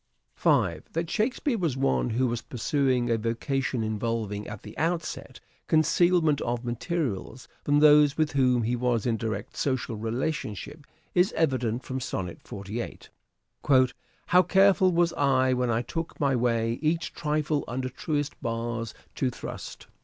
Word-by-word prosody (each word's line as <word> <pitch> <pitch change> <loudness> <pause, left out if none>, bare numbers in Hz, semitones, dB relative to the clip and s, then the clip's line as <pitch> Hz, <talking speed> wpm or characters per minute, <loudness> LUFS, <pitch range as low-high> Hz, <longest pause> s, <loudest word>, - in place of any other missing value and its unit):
That 165 0 +1
Shakespeare 235 +2 0
was 160 -8 0
one 135 -2 +1
who 120 +3 +1
was 120 -1 -1
pursuing 125 -1 0
a 115 - +2
vocation 120 +2 -1
involving, 110 -1 -2
at 105 -1 -8
the - - -10
outset, 165 0 -3 0.3
concealment 160 -1 +3
of 120 0 -2
materials 125 - -3 0.2
from 145 0 +3
those 150 -1 +6
with 155 -1 +1
whom 125 -4 +3
he 120 +3 0
was 120 -3 0
in 120 -2 +1
direct 110 -2 -4
social 130 -4 -1
relationship 125 - -4 0.3
is 180 +2 +3
evident 130 -6 0
from 130 0 -4
Sonnet 95 -8 -4
48. 100 +4 -6 0.6
" 130 -3 +1
How 180 - +5
careful 190 0 +4
was 170 0 +2
I 130 -2 +3
when 125 -1 0
I 115 +1 +1
took 165 +7 -5
my 140 -2 +2
way 115 -1 0
Each 160 +2 0
trifle 150 -1 -1
under 130 +2 -3
truest 145 +3 -3
bars 115 0 -3 0.2
to 130 - 0
thrust." 120 - -8
130 Hz, 145 wpm, -27 LUFS, 115-155 Hz, 0.6 s, those